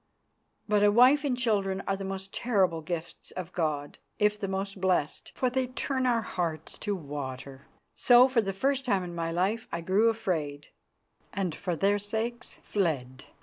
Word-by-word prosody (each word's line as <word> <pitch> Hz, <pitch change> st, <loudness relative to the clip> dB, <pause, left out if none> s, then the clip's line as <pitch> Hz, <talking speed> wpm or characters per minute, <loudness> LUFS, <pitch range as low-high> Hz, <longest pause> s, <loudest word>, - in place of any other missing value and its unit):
But 210 Hz, -1 st, +3 dB
a 205 Hz, -, +6 dB
wife 255 Hz, +7 st, +6 dB
and 265 Hz, -4 st, 0 dB
children 200 Hz, -5 st, 0 dB
are 195 Hz, -, +1 dB
the 195 Hz, -, -6 dB
most 195 Hz, 0 st, -6 dB
terrible 190 Hz, -9 st, +1 dB
gifts 170 Hz, +1 st, -5 dB
of 185 Hz, -1 st, -7 dB
God, 150 Hz, -4 st, -2 dB, 0.2 s
if 210 Hz, 0 st, +2 dB
the 200 Hz, -, -2 dB
most 195 Hz, 0 st, -4 dB
blessed, 180 Hz, -6 st, 0 dB
for 255 Hz, -, +1 dB
they 255 Hz, +1 st, 0 dB
turn 260 Hz, +1 st, -1 dB
our 235 Hz, -2 st, +2 dB
hearts 165 Hz, -5 st, -4 dB
to 205 Hz, -, -1 dB
water. 140 Hz, -3 st, -7 dB, 0.3 s
So, 245 Hz, 0 st, +7 dB
for 255 Hz, -3 st, +2 dB
the 195 Hz, -2 st, -2 dB
first 270 Hz, +7 st, 0 dB
time 200 Hz, -7 st, +1 dB
in 175 Hz, -1 st, -6 dB
my 165 Hz, -1 st, -2 dB
life, 195 Hz, +7 st, 0 dB
I -, -, -3 dB
grew 195 Hz, +6 st, +3 dB
afraid, 155 Hz, -10 st, -2 dB, 0.6 s
and, 185 Hz, -4 st, -1 dB
for 180 Hz, +1 st, -3 dB
their 200 Hz, +4 st, +2 dB
sakes, 225 Hz, +4 st, -4 dB
fled. 135 Hz, -10 st, -2 dB
195 Hz, 175 wpm, -28 LUFS, 170-230 Hz, 0.6 s, So